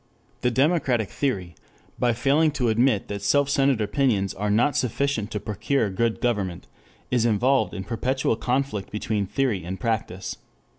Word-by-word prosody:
The 125 - +2
democratic 130 - +1
theory 95 -11 -2 0.5
by 120 -1 +2
failing 140 +6 +3
to 125 -5 0
admit 115 -1 +2
that 100 -1 -5
self 140 +8 +2
centered 135 -4 +2
opinions 105 -3 +1
are 105 +1 -2
not 120 +8 +2
sufficient 125 -3 0
to 105 - -3
procure 110 +2 -1
good 115 +4 0
government, 95 -7 -1 0.5
is 125 -2 +2
involved 120 +4 +2
in 95 - -4
perpetual 125 +4 0
conflict 125 -4 -1
between 105 -1 -2
theory 120 -7 0
and 95 +3 -5
practice. 110 -5 -3
115 Hz, 150 wpm, -24 LUFS, 100-135 Hz, 0.5 s, failing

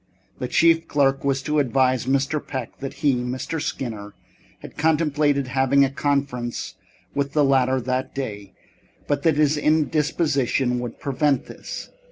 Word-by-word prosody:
The 125 - -2
chief 165 +3 +3
clerk 135 -2 +2
was 135 -1 0
to 150 +1 +1
advise 130 -2 +2
Mr. 140 +3 +1
Peck 130 -4 -6
that 135 -1 -4
he, 140 - +5
Mr. 130 +6 -3
Skinner, 110 -8 -5 0.5
had - - -10
contemplated 150 -3 +1
having 135 +1 +3
a 135 - -3
conference 140 -4 -2 0.4
with 140 0 -2
the 150 - +3
latter 130 -1 +3
that 130 +1 -3
day, 105 -7 -5 0.5
but 145 -1 0
that 160 -2 +2
his 150 0 +3
indisposition 150 -4 +1
would 120 -2 -6
prevent 140 -1 0
this. - - -8
135 Hz, 145 wpm, -23 LUFS, 130-150 Hz, 0.5 s, he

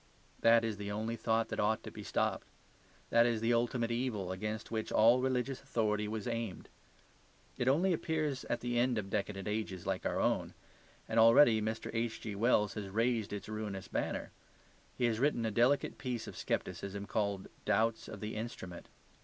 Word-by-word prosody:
That 115 0 +5
is 110 -2 -2
the 100 0 -5
only 110 +3 -2
thought 115 0 0
that - - -3
ought 110 +1 +1
to - - -7
be - - -8
stopped. - - -1 0.6
That 115 0 +6
is 115 -2 +1
the 115 +2 +2
ultimate 120 0 +1
evil 115 -6 -1
against 105 +4 -4
which 110 -1 -2
all 120 +3 +5
religious 130 0 -1
authority 105 -5 0
was 110 -1 -4
aimed. 115 -5 -4 0.9
It 125 - -2
only 175 +8 +4
appears 155 -4 -1
at 120 - -2
the 120 0 0
end 125 -1 +2
of 100 -2 -3
decadent 100 -1 -2
ages 105 -4 -3
like - - -1
our - - -1
own: - - 0 0.5
and 110 - +1
already 115 0 +7
Mr. 110 +1 -3
H.G.Wells 110 -1 +1
has 105 -3 -5
raised 115 +1 0
its 105 -1 -5
ruinous 105 -3 -5
banner; - - -2 0.7
he 125 - +2
has 115 -2 +1
written 135 -4 +2
a 110 - 0
delicate 125 +6 +2
piece 125 -3 -3
of - - -8
scepticism 100 +1 -3
called 100 -2 -1 0.2
"Doubts 110 +2 +1
of 105 - -8
the 110 +1 -4
Instrument." 100 -6 -6
110 Hz, 175 wpm, -33 LUFS, 105-120 Hz, 0.9 s, already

